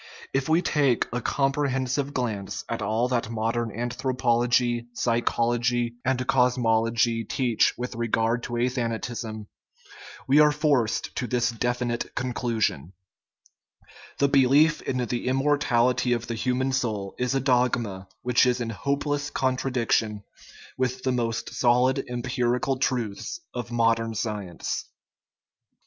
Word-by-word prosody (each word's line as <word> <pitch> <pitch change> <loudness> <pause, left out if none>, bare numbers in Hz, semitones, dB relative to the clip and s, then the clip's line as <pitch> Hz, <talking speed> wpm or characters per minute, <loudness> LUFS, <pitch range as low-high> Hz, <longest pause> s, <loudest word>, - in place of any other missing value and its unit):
If 135 +2 0
we 165 +3 +3
take 140 -6 +2
a 120 - -1
comprehensive 135 0 0
glance 110 -8 -3
at - - -3
all 115 +3 +1
that 120 -3 -1
modern 115 0 -1
anthropology, 120 0 0
psychology, 120 0 0
and 130 0 0
cosmology 115 -2 +2
teach 120 0 +1
with 125 +1 -4
regard 115 0 0
to 120 - -6
athanatism, 115 -2 -2 0.8
we 140 +3 +5
are 150 0 +6
forced 145 -7 0
to 125 - -1
this 120 +1 +1
definite 120 0 -2
con 125 -1 -2
clusion: 110 - -1 0.6
" - - -23
The 140 - +3
belief 140 +3 +4
in 130 - -2
the 120 +1 -3
immortality 125 -3 +2
of 120 0 -2
the 120 - -4
human 130 +3 0
soul 110 -7 -2
is 125 +1 0
a - - +3
dogma 120 -7 0 0.2
which 125 +1 +3
is 125 0 +1
in 115 -1 -3
hopeless 145 +4 -1
contradiction 125 -6 0 0.6
with 130 0 -1
the 130 - +1
most 115 -2 -2
solid 125 +2 +3
empirical 125 +1 -1
truths 125 - -2
of 120 -1 -5
modern 115 -1 +1
science." 105 -6 -3
120 Hz, 125 wpm, -26 LUFS, 115-130 Hz, 0.8 s, are